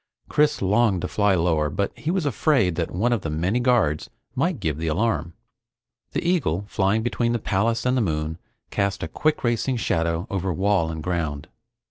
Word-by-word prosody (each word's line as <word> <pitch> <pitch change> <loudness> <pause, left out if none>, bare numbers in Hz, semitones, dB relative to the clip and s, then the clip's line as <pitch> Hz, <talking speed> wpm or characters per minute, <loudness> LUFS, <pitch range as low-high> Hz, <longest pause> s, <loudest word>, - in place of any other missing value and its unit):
Chris 150 -7 +2
longed 100 0 +3
to 90 - -2
fly 100 -1 +2
lower 80 -3 +1
but 100 +7 -2
he 155 - -4
was 180 -2 0
afraid 130 - +2
that 85 0 -2
one 115 +7 +1
of 115 - 0
the 80 - -3
many 90 +10 0
guards 120 - +2 0.2
might 150 +3 0
give 80 -6 -2
the 80 - -2
alarm. 85 -1 0 0.8
The - - -1
eagle 115 - +1
flying 100 +2 +1
between 120 0 0
the - - +2
palace 110 +2 0
and 125 0 +2
the 125 - +2
moon 80 -3 -2 0.3
cast 100 -1 -1
a - - -2
quick 150 - 0
racing 120 +2 +1
shadow 85 -4 0
over 95 -1 -1
wall 95 -1 +1
and 80 -1 -5
ground. 80 -3 -2
100 Hz, 185 wpm, -24 LUFS, 80-120 Hz, 0.8 s, longed